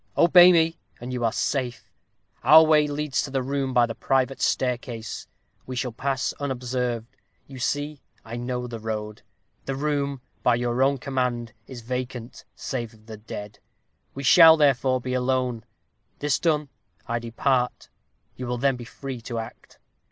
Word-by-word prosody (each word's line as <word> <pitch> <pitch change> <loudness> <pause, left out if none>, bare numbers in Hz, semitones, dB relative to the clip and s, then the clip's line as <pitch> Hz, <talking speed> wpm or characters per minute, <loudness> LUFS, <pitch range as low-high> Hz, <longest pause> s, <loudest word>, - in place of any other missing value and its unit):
Obey 175 +1 +8
me, 165 -1 +2 0.2
and 125 +2 -6
you 125 -1 -2
are 115 - +2
safe. 125 -1 -2 0.6
Our 160 +1 +8
way 155 -1 +4
leads 145 -1 -1
to - - -5
the 135 -1 -1
room 135 0 -2
by 125 -2 +4
the 115 - -5
private 135 +2 0
staircase 125 -3 -2 0.4
we 130 - -5
shall 125 0 -2
pass 135 +2 -2
unobserved 125 -4 -2 0.4
you 135 -2 -11
see 145 +3 -2 0.2
I 115 +1 -7
know 125 +1 -3
the 120 -2 -6
road. 105 -1 -5 0.4
The 135 - -3
room, 140 -2 -1 0.2
by 125 - +3
your 120 +1 -1
own 140 +1 +3
command, 125 -3 -2
is 125 -3 -9
vacant 125 0 -5
save 120 -3 -5
of 110 0 -23
the 110 -1 -9
dead. 105 -1 -8 0.6
We 140 - -5
shall, 160 +3 +8
therefore, 130 -3 +3
be 125 +1 -3
alone. 125 -2 0 0.5
This 145 -2 0
done, 150 -4 +1 0.4
I 115 0 -1
depart. 125 +2 -1 0.5
You 125 - -6
will 125 0 -2
then 135 +1 +1
be 120 - -8
free 130 +1 -7
to 115 +1 -5
act. 115 0 -8
130 Hz, 160 wpm, -25 LUFS, 120-140 Hz, 0.6 s, Obey